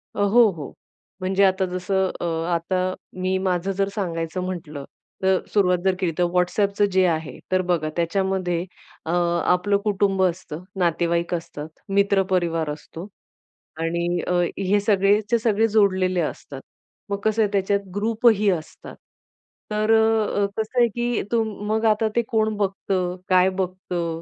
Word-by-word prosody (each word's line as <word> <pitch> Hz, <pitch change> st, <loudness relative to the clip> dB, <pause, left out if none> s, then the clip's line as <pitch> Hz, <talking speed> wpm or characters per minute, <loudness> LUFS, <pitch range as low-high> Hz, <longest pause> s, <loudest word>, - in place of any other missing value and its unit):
अ, -, -, -5 dB
हो, 220 Hz, +3 st, +5 dB
हो. 155 Hz, -6 st, -8 dB, 0.5 s
म्हणजे 190 Hz, +1 st, +2 dB
आता 190 Hz, 0 st, +2 dB
जसं 190 Hz, +1 st, 0 dB
अ, -, -, -1 dB, 0.3 s
आता 185 Hz, +2 st, -1 dB, 0.3 s
मी 185 Hz, +1 st, +1 dB
माझं 185 Hz, 0 st, -1 dB
जर 195 Hz, +1 st, 0 dB
सांगायचं 170 Hz, -3 st, -3 dB
म्हटलं 155 Hz, -6 st, -6 dB, 0.4 s
तर 190 Hz, -1 st, +3 dB
सुरुवात 180 Hz, -3 st, +3 dB
जर 190 Hz, -1 st, +3 dB
केली 180 Hz, -3 st, 0 dB
तर 180 Hz, -, +2 dB
WhatsAppचं 200 Hz, +3 st, +2 dB
जे 185 Hz, 0 st, +3 dB
आहे 160 Hz, -2 st, -2 dB
तर 185 Hz, 0 st, +3 dB
बघा 175 Hz, -4 st, 0 dB
त्याच्यामध्ये 180 Hz, 0 st, -1 dB, 0.4 s
अ, 160 Hz, -, -2 dB
आपलं 175 Hz, +3 st, +2 dB
कुटुंब 195 Hz, -2 st, +1 dB
असतं, 175 Hz, -2 st, -2 dB, 0.2 s
नातेवाईक 170 Hz, 0 st, 0 dB
असतात, 160 Hz, -3 st, -5 dB, 0.2 s
मित्र 200 Hz, 0 st, +3 dB
परिवार 165 Hz, -4 st, 0 dB
असतो 160 Hz, +4 st, -8 dB, 0.7 s
आणि 170 Hz, +1 st, -1 dB
अ, -, -, +1 dB, 0.2 s
हे 195 Hz, +1 st, +2 dB
सगळेच्या 205 Hz, +2 st, +2 dB
सगळे 225 Hz, 0 st, +2 dB
जोडलेले 190 Hz, -4 st, +2 dB
असतात. 140 Hz, -3 st, -5 dB, 0.5 s
मग 200 Hz, -, -1 dB
कसं 220 Hz, +1 st, +2 dB
आहे 210 Hz, -2 st, +1 dB
त्याच्यात 200 Hz, 0 st, +1 dB, 0.2 s
ग्रुपही 215 Hz, 0 st, +3 dB
असतात. 165 Hz, -5 st, -4 dB, 0.8 s
तर 215 Hz, +1 st, +1 dB
अ, 220 Hz, -2 st, +2 dB
कसं 220 Hz, +3 st, -1 dB
आहे 240 Hz, -, +6 dB
की 240 Hz, -1 st, 0 dB
तुम 225 Hz, -2 st, 0 dB
मग 220 Hz, +1 st, 0 dB
आता 220 Hz, 0 st, +3 dB
ते 235 Hz, -, +4 dB
कोण 220 Hz, -1 st, +1 dB
बघतं, 190 Hz, -2 st, -1 dB
काय 185 Hz, 0 st, +5 dB
बघतं, 180 Hz, -3 st, -3 dB
190 Hz, 145 wpm, -23 LUFS, 175-205 Hz, 0.8 s, आहे